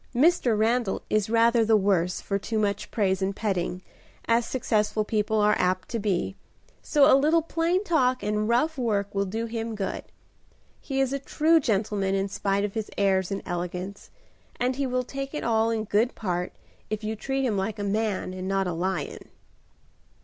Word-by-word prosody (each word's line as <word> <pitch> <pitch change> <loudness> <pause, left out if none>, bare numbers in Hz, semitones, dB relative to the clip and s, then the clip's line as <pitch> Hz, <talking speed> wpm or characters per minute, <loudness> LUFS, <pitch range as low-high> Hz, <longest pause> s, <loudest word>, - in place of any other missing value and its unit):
Mr. 265 -5 +3
Randal 225 -1 +1
is 215 -1 +1
rather 230 +1 +4
the 220 0 +4
worse 185 -3 +1
for 200 0 -2
too 220 +3 -3
much 205 -1 -1
praise 190 -3 0
and 190 +1 -1
petting, 185 -4 -2 0.4
as 230 0 +2
successful 215 -4 0
people 215 0 0
are 210 0 +4
apt 185 0 0
to 230 - -2
be, 195 -2 -1 0.5
so 290 -3 +4
a 305 - +6
little 310 +4 +3
plain 335 +4 0
talk 255 -9 +1
and 210 +1 0
rough 280 +6 +1
work 205 -4 0
will 200 0 0
do 225 +4 -3
him 225 -1 -4
good. 195 -2 -3 0.8
He 270 -2 -3
is 270 0 +1
a 275 - -1
true 320 +4 +3
gentleman 205 -5 0
in 195 0 -1
spite 200 0 0
of 205 - -5
his 220 -1 -3
airs 190 -2 +2
and 195 - -4
elegance, 180 +2 -5 0.5
and 250 +1 +1
he 275 0 -1
will 255 0 0
take 275 +3 -6
it - - -3
all 225 -1 +2
in 225 -1 -1
good 220 +3 +1
part, 180 -4 -2 0.4
if 215 0 -3
you 215 +1 -2
treat 270 +4 -2
him 225 -5 0
like 200 +2 -2
a 205 - -3
man 205 -2 -1
and 185 0 -5
not 195 0 +1
a 180 - -2
lion." 185 +3 -3
215 Hz, 185 wpm, -26 LUFS, 195-245 Hz, 0.8 s, a